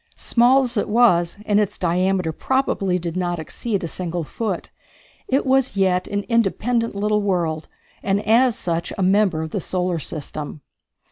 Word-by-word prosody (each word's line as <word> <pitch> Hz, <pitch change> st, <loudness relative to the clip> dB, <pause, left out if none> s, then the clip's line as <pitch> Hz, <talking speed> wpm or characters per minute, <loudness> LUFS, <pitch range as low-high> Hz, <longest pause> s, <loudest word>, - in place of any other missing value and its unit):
Small 250 Hz, +3 st, +4 dB
as 245 Hz, -2 st, -3 dB
it 205 Hz, -, 0 dB
was, 200 Hz, -7 st, +3 dB
and 205 Hz, 0 st, +3 dB
its 210 Hz, -2 st, -1 dB
diameter 180 Hz, 0 st, +1 dB
probably 195 Hz, -, 0 dB
did 170 Hz, -1 st, -5 dB
not 175 Hz, -1 st, -1 dB
exceed 195 Hz, +6 st, -3 dB
a -, -, -2 dB
single 175 Hz, 0 st, -4 dB
foot, 195 Hz, +3 st, -4 dB, 0.6 s
it 270 Hz, +2 st, +1 dB
was 265 Hz, -4 st, +2 dB
yet 185 Hz, -2 st, +2 dB
an 205 Hz, 0 st, -2 dB
independent 230 Hz, +1 st, 0 dB
little 210 Hz, +1 st, +1 dB
world, 170 Hz, -6 st, -1 dB, 0.3 s
and 195 Hz, +1 st, +1 dB
as 235 Hz, +2 st, +4 dB
such 170 Hz, -1 st, -2 dB
a 195 Hz, -, 0 dB
member 190 Hz, -4 st, +2 dB
of 160 Hz, -, -6 dB
the 200 Hz, -, -2 dB
solar 180 Hz, -2 st, -1 dB
system. 150 Hz, 0 st, -6 dB
195 Hz, 160 wpm, -21 LUFS, 175-230 Hz, 0.6 s, Small